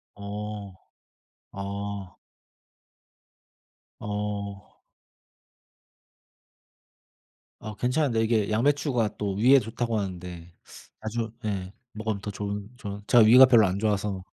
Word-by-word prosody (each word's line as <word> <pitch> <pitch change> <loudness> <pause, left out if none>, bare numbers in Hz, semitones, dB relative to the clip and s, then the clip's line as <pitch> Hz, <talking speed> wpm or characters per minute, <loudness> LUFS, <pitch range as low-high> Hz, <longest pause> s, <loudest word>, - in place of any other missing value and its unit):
어. 105 0 -6 0.8
아. 100 -1 -6 1.8
어. 105 -1 -4 2.9
아 110 0 -7
괜찮은데 125 +1 +1
이게 110 -2 +1
양배추가 120 -2 +1
또 100 -2 -2
위에 125 +7 +6
좋다고 115 0 -2
하는데 90 -3 -6 0.5
자주 115 +1 -2
예. 100 -3 -3 0.2
먹으면 110 -2 -3
더 105 - -5
좋은 100 0 -5
좋은 100 -3 -7
제가 120 -3 +7
위가 125 +4 +9
별로 115 -5 +6
안 95 +1 -2
좋아서. 100 -3 -1
105 Hz, 185 characters per minute, -26 LUFS, 100-115 Hz, 2.9 s, 위가